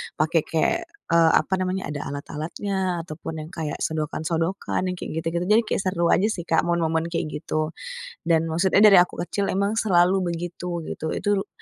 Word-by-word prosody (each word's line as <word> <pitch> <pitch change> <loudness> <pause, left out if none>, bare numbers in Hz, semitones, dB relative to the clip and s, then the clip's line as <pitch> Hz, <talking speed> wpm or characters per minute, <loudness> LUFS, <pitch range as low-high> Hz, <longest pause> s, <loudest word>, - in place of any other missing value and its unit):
pakai 160 +1 +2
kayak, 165 - +1 0.3
eee, 165 -1 +5
apa 190 - +1
namanya, 185 -4 -2
ada 145 - -5
alat-alatnya 170 +5 -3
ataupun 155 0 -6
yang 160 - -11
kayak 160 -4 -4
sodokan-sodokan 165 +4 -1
yang - - -4
kayak - - -6
gitu-gitu. 170 +1 -1 0.2
Jadi - - +3
kayak - - 0
seru 170 -2 +1
aja 205 +4 +3
sih, 175 -5 -5
Kak, 165 - +3
momen-momen 165 -1 0
kayak 165 - -1 0.2
gitu. 155 +1 -2 0.5
Dan 165 -1 +4
maksudnya 190 +5 +3
dari 195 -4 +9
aku 180 - 0
kecil 200 +2 -2
emang 200 +2 +1
selalu 185 -1 +3
begitu 170 0 -4
gitu. 160 - -5
Itu 205 -1 0
170 Hz, 170 wpm, -24 LUFS, 160-185 Hz, 0.5 s, dari